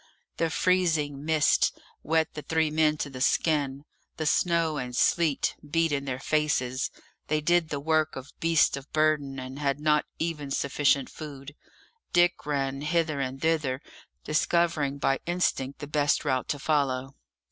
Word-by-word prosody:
The 165 - +1
freezing 160 -6 +1
mists 155 -1 +3 0.3
wet 160 0 +1
the 150 - -6
three 160 +1 0
men 155 0 +2
to 145 - -3
the 130 -1 -7
skin; 145 -1 +1 0.3
the 155 - -2
snow 165 0 +2
and 125 -2 -4
sleet 160 +2 +2
beat 165 +2 +1
in 140 -1 -1
their 130 -2 -3
faces; 135 -4 0 0.4
they 155 0 +1
did 170 +1 +2
the 145 - -3
work 155 +1 +1
of 135 +1 -9
beasts 165 -1 +3
of 140 +1 -10
burden, 155 -3 +1
and 130 +1 -7
had 140 -1 0
not 150 0 +2
even 155 -4 -3
sufficient 140 0 +1
food. 145 -2 -9 0.6
Dick 175 -2 +3
ran 135 -1 -1
hither 155 -1 0
and 135 0 -3
thither, 155 -5 +1 0.4
discovering 155 -2 +1
by 135 -1 +1
instinct 155 -6 0
the 145 - -6
best 145 0 +1
route 130 -3 0
to 145 - -1
follow. 135 -3 0
150 Hz, 155 wpm, -27 LUFS, 140-160 Hz, 0.6 s, mists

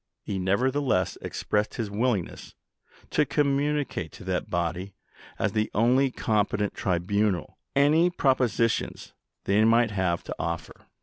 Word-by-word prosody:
He 95 - -3
nevertheless 110 +2 +1
expressed 105 0 -2
his 110 -3 -3
willingness 105 -3 -2 0.6
to - - +3
communicate 145 - 0
to - - -11
that - - -2
body, 90 +3 -2 0.4
as 110 - 0
the 110 0 0
only 125 +5 +4
competent 105 -3 0
tribunal, 95 +1 -1 0.2
any 155 +5 +4
propositions 130 -8 0 0.3
they 100 +2 +3
might 115 0 +4
have 95 -4 0
to - - -6
offer." 85 -1 -5
110 Hz, 120 wpm, -26 LUFS, 95-130 Hz, 0.6 s, only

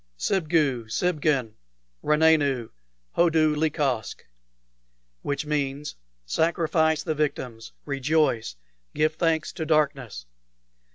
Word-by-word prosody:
"Sibgu 150 - 0
Sibgin! 145 -6 0 0.5
Ranenu! 150 -6 +2 0.4
Hodu 160 -3 +3
lecosck!" 145 -7 -1 1.0
which 145 +1 -3
means, 145 -1 -2 0.3
"Sacrifice 160 - +1
the 160 - -1
victims! 125 -7 -3
Rejoice! 140 - 0 0.4
Give 155 +1 +2
thanks 160 -1 0
to 170 - -4
darkness!" 140 - 0
150 Hz, 80 wpm, -25 LUFS, 135-160 Hz, 1.0 s, Hodu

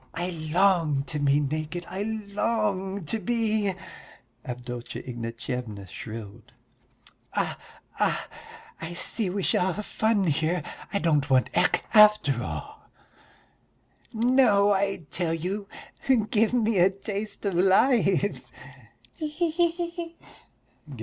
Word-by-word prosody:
"I 175 +2 -2 0.2
long 170 -6 +3
to 150 +2 -5
be 145 0 +3
naked, 155 +4 -3
I 190 +2 -5
long 205 -3 -1
to 225 +9 0
be," 220 -3 0 0.7
Avdotya 125 -1 -6
Ignatyevna 115 -3 -5
shrilled. 115 +3 -9 0.8
"Ah... - - 0 0.4
ah, - - +1 0.5
I 165 +1 -5
see 190 +3 0
we 195 +1 -2
shall 180 +1 +2
have 210 +3 -5
fun 220 -2 +1
here; 160 +1 0 0.3
I - - +1
don't 150 -5 +1
want 130 -1 +3
Ecke - - +3
after 210 - +6
all." 80 -3 -7 1.2
"No, 225 -4 +4
I 195 -3 -1
tell 165 -2 0
you. 195 +5 -4 0.6
Give 220 0 +3
me 225 -5 +2
a 180 +2 +6
taste 200 +1 -5
of 200 - +1
life!" 195 - +3 0.7
"He 310 - -4
he 325 +3 -1 0.2
he!" 340 0 -5
190 Hz, 115 wpm, -26 LUFS, 150-215 Hz, 1.2 s, after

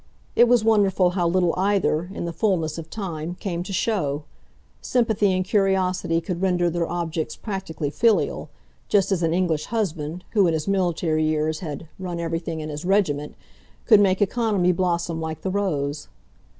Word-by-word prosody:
It 240 - +6
was 240 -2 +4
wonderful 200 -5 +3
how 175 -2 0
little 175 -1 +2
either, 185 -3 +1
in 195 - -5
the 170 - -4
fulness 165 -4 0
of 165 0 -9
time, 175 -5 -5
came 175 -2 -4
to 190 +3 -6
show; 165 -8 -1 0.6
sympathy 220 -5 +2
and 185 0 0
curiosity 185 -4 +1
could 175 +1 -4
render 175 -2 +2
their 170 0 -1
objects 165 -2 -3
practically 180 -8 -4
filial, 225 +6 +1 0.4
just 195 -1 +3
as 185 -3 +1
an 165 -1 +1
English 165 -3 0
husband 175 -6 -3
who 200 -4 +4
in 165 - +1
his 155 +2 -3
military 175 -5 +1
years 155 0 0
had 160 -2 -6
"run" 180 -2 -4
everything 165 -1 -3
in 155 - -5
his 150 0 -6
regiment 175 -7 +1 0.5
could 215 -4 +7
make 195 -1 +3
economy 205 -4 +1
blossom 170 -2 -1
like 160 -1 -4
the 190 - -1
rose. 155 -8 -2
175 Hz, 165 wpm, -23 LUFS, 160-195 Hz, 0.6 s, could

